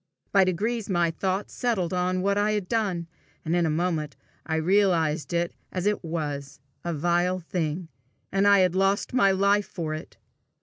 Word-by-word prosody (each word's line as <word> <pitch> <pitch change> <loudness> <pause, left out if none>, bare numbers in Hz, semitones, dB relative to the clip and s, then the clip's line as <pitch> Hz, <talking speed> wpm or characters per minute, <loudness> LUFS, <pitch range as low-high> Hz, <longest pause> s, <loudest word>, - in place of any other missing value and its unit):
By 195 -1 +6
degrees 210 +5 -1
my 175 -3 +2
thought 190 +4 -2
settled 205 -9 -1
on 185 0 0
what 200 0 +2
I 205 +1 +2
had 205 -4 -2
done, 195 -7 0 0.4
and 165 +2 +1
in 175 -2 +2
a - - 0
moment 155 -2 -1 0.3
I 160 - 0
realized 165 -3 +2
it 170 0 0 0.2
as 185 0 -3
it 210 -1 +1
was 145 -4 -4 0.2
a 175 - -2
vile 175 +3 +1
thing, 165 -1 -3 0.4
and 195 +1 +3
I 200 -1 +6
had 180 -2 +3
lost 195 +4 +1
my 240 -6 +5
life 200 +1 +2
for 165 -5 -4
it! 155 - -8
180 Hz, 175 wpm, -26 LUFS, 165-200 Hz, 0.4 s, By